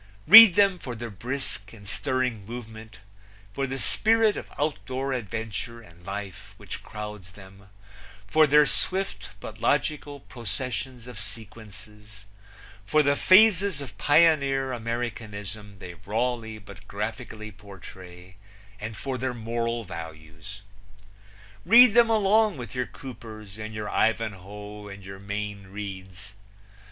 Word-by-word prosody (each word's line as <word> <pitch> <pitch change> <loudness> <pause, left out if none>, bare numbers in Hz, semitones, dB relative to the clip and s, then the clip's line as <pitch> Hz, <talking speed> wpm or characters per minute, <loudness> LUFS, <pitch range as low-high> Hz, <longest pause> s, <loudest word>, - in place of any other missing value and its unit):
Read 225 -3 +11
them 200 -3 +4
for 125 -6 -6
their 120 0 -7
brisk 115 0 -4
and 100 -3 -13
stirring 125 -1 -1
movement; 110 -1 -9 0.6
for 135 +3 -2
the 135 +1 -4
spirit 220 +7 +3
of - - -8
outdoor 135 -2 -2
adventure 115 0 -5
and 85 -5 -17
life 100 0 -7
which 100 -2 -7
crowds 105 -4 -8
them; 100 0 -15 0.6
for 155 +8 +4
their 150 +1 +6
swift 190 +6 0
but - - -9
logical 145 -2 0
processions 125 0 -4
of 125 -4 -9
sequences; 105 0 -10 0.6
for 150 +10 +2
the 140 0 +2
phases 195 -2 +5
of 130 -7 -9
pioneer 140 -4 +3
Americanism 110 -4 -5
they 90 -2 -9
rawly 110 +4 -3
but 100 -1 -14
graphically 110 +1 -6
portray, 95 -2 -13 0.4
and 110 +1 -6
for 130 -2 -4
their 130 0 -2
moral 115 0 -2
values. 80 +1 -9 1.0
Read 235 - +8
them 235 0 +5
along 215 -2 +3
with 120 -4 -8
your 125 -1 -2
Coopers 110 -5 -11
and 110 0 -6
your 110 -1 -5
Ivanhoe 105 -1 -2
and 100 0 -10
your 95 0 -9
Mayne 100 0 -5
Reids. 95 -1 -8
110 Hz, 125 wpm, -26 LUFS, 100-135 Hz, 1.0 s, Read